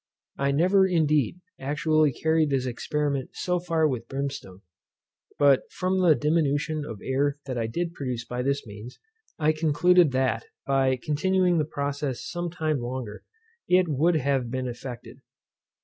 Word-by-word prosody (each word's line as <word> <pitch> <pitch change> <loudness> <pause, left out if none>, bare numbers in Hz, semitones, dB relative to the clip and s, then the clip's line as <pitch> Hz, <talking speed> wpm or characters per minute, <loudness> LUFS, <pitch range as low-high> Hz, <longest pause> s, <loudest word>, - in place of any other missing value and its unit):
I 140 0 +1
never, 185 +7 +4
indeed, 155 - +1 0.2
actually 150 +2 +2
carried 160 +2 +1
this 135 -2 0
experiment 140 +2 -2
so 180 -1 -1
far 165 -2 +1
with 120 -5 -3
brimstone; 135 -9 -5 0.8
but 140 -2 +3
from 185 +1 -1
the 170 -4 +5
diminution 150 0 0
of 115 -8 -8
air 140 +2 0
that 130 -2 -4
I 115 -2 -1
did 170 +8 -3
produce 125 -6 -4
by 125 +1 -4
this 140 +2 -1
means, 105 +3 -10 0.4
I 155 -1 +3
concluded 160 +1 +3
that, 130 -3 0 0.2
by 135 -1 +2
continuing 180 +3 +2
the 155 - +1
process 140 -3 -3
some 175 0 -3
time 155 -4 -1
longer, 120 -3 -5 0.4
it 180 0 +4
would 160 +4 +2
have 135 -4 0
been 130 +1 -3
effected. 120 0 -8
145 Hz, 150 wpm, -26 LUFS, 130-160 Hz, 0.8 s, the